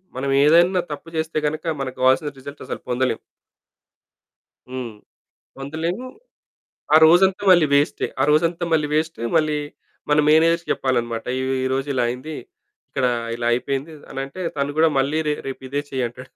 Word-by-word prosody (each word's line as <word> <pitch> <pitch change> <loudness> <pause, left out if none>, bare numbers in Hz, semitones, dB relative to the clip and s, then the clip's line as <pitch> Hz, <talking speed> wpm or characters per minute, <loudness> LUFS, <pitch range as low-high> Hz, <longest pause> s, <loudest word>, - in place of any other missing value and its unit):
మనం 135 +2 -2 0.2
ఏదైనా 175 +4 +5
తప్పు 150 +3 -7
చేస్తే 160 0 -2
గనక 155 +3 -4 0.2
మనకు 130 -1 -5
కావాల్సిన 130 +4 +3
రిజల్ట్స్ 140 +2 -10
అసలు - - -6
పొందలేము. 125 -1 0 1.5
హ్మ్. 125 -2 -5 0.7
పొందలేము. 160 - -4 0.9
ఆ - - +10
రోజంతా 190 +4 +4
మళ్ళీ 175 -4 +6
వేస్టే. 145 +1 +2
ఆ - - +4
రోజంతా 165 +3 +2
మళ్ళీ 155 -2 +2
వేస్టు. 160 -2 -1 0.2
మళ్లీ 155 -1 +2 0.5
మన 150 - +4
మేనేజర్‌కి 165 +2 +3
చెప్పాలన్నమాట. 120 -3 -1
"ఈ - - -2 0.2
ఈ - - 0
రోజు 135 +2 -1
ఇలా 125 -2 +1
అయింది. 130 +6 -5 0.5
ఇక్కడ 130 -2 0 0.3
ఇలా 120 0 -3
అయిపోయింది" 135 +5 -2 0.2
అనంటే 135 +6 -6 0.2
తను 140 +1 -2
కూడా 165 +1 +6
మళ్ళీ 140 +4 +1
"రే 150 - +2
రేపు 135 0 -6
ఇదే 145 +2 -2
చెయ్యి" 130 -2 -1
అంటాడు. 125 +2 -13
145 Hz, 150 wpm, -22 LUFS, 130-160 Hz, 1.5 s, ఆ